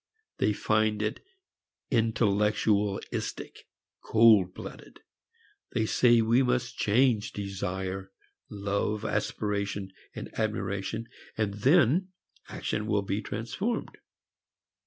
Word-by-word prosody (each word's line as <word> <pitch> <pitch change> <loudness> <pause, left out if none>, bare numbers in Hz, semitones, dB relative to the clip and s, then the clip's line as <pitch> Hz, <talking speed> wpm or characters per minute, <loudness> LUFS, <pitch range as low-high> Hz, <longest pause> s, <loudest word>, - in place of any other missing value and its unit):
They - - +3
find 110 0 +1
it 110 - -3 0.7
intellectualistic, 105 -3 0 0.4
cold 110 -5 +5
blooded. - - -10 0.7
They 110 - +1
say 120 +1 +4
we 115 +3 +3
must 125 -1 0
change 110 -1 +2
desire, 95 -1 -4 0.4
love, 100 +1 -2
aspiration, 100 -3 -2 0.4
admiration, 105 +1 -2 0.3
and 105 -2 0
then 145 - +4 0.4
action 105 - -3
will 105 -2 +1
be 100 +2 -2
transformed. 115 - -3
105 Hz, 85 wpm, -28 LUFS, 100-115 Hz, 0.7 s, cold